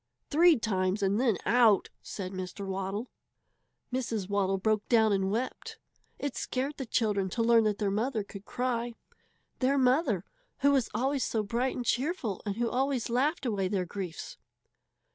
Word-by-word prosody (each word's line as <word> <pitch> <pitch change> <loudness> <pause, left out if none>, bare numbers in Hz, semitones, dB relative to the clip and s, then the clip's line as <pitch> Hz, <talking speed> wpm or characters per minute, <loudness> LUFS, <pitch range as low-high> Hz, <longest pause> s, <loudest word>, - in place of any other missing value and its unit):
Three 330 +1 +6
times 195 -2 0
and 200 +4 +2
then 230 -7 +2
out!" 225 -2 +4
said 185 -2 -6
Mr. 185 +1 -5
Waddle. 195 +4 -3 0.8
Mrs. 230 -6 -2
Waddle 195 -1 +1
broke 215 +2 0
down 220 -3 +4
and 190 -1 +1
wept. 235 +6 -3 0.4
It 285 -2 -3
scared 270 +3 -2
the 265 - -5
children 205 -5 +1
to 230 +5 -1
learn 230 -1 +5
that 210 -1 +1
their 205 -2 0
mother 220 +2 0
could 200 0 -10
cry 240 0 -2 0.6
their 275 +2 +2
mother, 255 - +2 0.4
who 280 +1 +5
was 270 -5 +2
always 265 +3 +1
so 220 -2 0
bright 235 +5 -1
and 245 - -4
cheerful 250 - -1
and 200 - -1
who 235 +1 0
always 255 -1 0
laughed 280 +5 +1
away 200 -5 0
their 185 -1 -1
griefs! 180 -2 -6
225 Hz, 160 wpm, -29 LUFS, 200-255 Hz, 0.8 s, Three